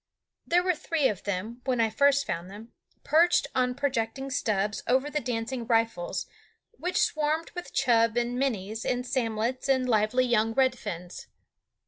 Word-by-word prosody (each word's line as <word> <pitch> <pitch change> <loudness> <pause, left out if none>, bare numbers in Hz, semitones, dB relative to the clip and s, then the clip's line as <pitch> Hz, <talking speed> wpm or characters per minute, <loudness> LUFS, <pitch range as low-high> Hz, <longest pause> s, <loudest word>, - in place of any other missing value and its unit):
There 350 +1 +3
were 365 0 +2
three 315 -3 0
of 200 - -5
them, 210 +5 -4
when 255 -3 0
I 225 -1 +2
first 280 +1 +3
found 170 +2 -4
them, 215 +4 -11 0.3
perched 335 +1 +4
on 250 -1 +1
projecting 270 -1 -2
stubs 210 -4 0
over 265 +4 +2
the 300 - 0
dancing 240 -1 -3
riffles, 225 -6 0 0.5
which 365 -5 -3
swarmed 310 +1 0
with 355 - -7
chub 230 -1 +2
and 240 0 0
"minnies" 220 -5 -2
and 250 0 -1
samlets 240 0 -1
and 260 -1 +2
lively 225 +2 +2
young 225 -2 +2
red 260 -1 +3
fins. 180 -6 -7
245 Hz, 155 wpm, -27 LUFS, 220-275 Hz, 0.5 s, perched